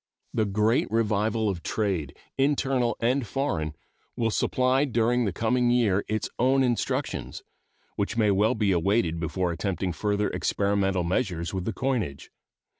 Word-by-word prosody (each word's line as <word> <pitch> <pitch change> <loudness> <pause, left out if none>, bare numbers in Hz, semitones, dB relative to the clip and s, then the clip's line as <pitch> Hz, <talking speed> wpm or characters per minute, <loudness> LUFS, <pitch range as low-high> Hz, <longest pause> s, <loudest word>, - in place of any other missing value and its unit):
The 110 - +1
great 105 +4 +1
revival 110 0 +1
of 95 -4 -2
trade, 90 -11 -2 0.2
internal 135 -4 +1
and 125 +1 +1
foreign, 85 - -2 0.4
will 115 -1 0
supply 130 +4 +2
during 120 -2 +1
the 100 - 0
coming 120 +5 +1
year 110 -5 +2
its 110 0 -1
own 130 +2 +3
instructions, 120 -2 -2 0.5
which 100 +3 -2
may 105 -3 +3
well 100 +3 +2
be 105 -3 +1
awaited 85 -1 +1
before 90 +2 -1
attempting 90 +1 -2
further 105 +2 0
experimental 100 -2 0
measures 85 -2 -1
with 95 -2 -3
the 115 - -2
coinage. 110 - -2
105 Hz, 140 wpm, -26 LUFS, 95-120 Hz, 0.5 s, own